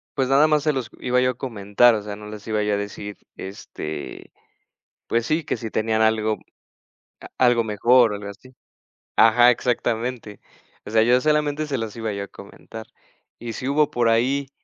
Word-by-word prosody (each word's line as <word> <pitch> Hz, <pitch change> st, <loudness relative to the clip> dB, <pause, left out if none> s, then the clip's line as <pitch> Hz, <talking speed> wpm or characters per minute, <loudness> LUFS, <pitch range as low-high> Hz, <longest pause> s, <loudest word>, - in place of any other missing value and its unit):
pues 130 Hz, -, 0 dB
nada 140 Hz, +3 st, +5 dB
más 150 Hz, -2 st, +2 dB
se 150 Hz, -1 st, +1 dB
los 125 Hz, -4 st, -4 dB
iba 125 Hz, 0 st, +1 dB
yo 125 Hz, 0 st, +2 dB
a 125 Hz, -, -13 dB
comentar, 110 Hz, -1 st, +2 dB
o 105 Hz, -, -3 dB
sea, 105 Hz, -1 st, -6 dB
no 105 Hz, -, -10 dB
les 105 Hz, -1 st, -10 dB
iba 110 Hz, -1 st, 0 dB
yo 105 Hz, 0 st, 0 dB
a -, -, +1 dB
decir, 100 Hz, 0 st, -6 dB, 0.2 s
este, 80 Hz, -6 st, -8 dB, 0.8 s
pues 115 Hz, 0 st, 0 dB
sí, 155 Hz, +3 st, 0 dB
que -, -, -2 dB
si 110 Hz, -3 st, -6 dB
tenían 110 Hz, 0 st, 0 dB
algo 110 Hz, -1 st, +1 dB, 0.8 s
a -, -, -11 dB
algo 120 Hz, -2 st, +4 dB
mejor 115 Hz, +2 st, +4 dB
o -, -, -3 dB
algo 100 Hz, 0 st, -8 dB
así. 130 Hz, +6 st, -15 dB, 0.6 s
Ajá, 120 Hz, +2 st, +6 dB
exactamente. 120 Hz, -2 st, -2 dB, 0.5 s
O -, -, -7 dB
sea, 110 Hz, 0 st, +4 dB
yo 125 Hz, +2 st, +4 dB
solamente 150 Hz, 0 st, 0 dB
se 135 Hz, -2 st, -2 dB
los 115 Hz, -2 st, -5 dB
iba 115 Hz, -2 st, -3 dB
yo 100 Hz, 0 st, -4 dB
a -, -, -18 dB
comentar. 110 Hz, +2 st, -11 dB, 0.5 s
Y 115 Hz, -1 st, -6 dB
si 125 Hz, +5 st, -5 dB
hubo 145 Hz, +1 st, +2 dB
por 120 Hz, -1 st, +1 dB
ahí 135 Hz, +4 st, +1 dB
115 Hz, 195 wpm, -22 LUFS, 105-130 Hz, 0.8 s, Ajá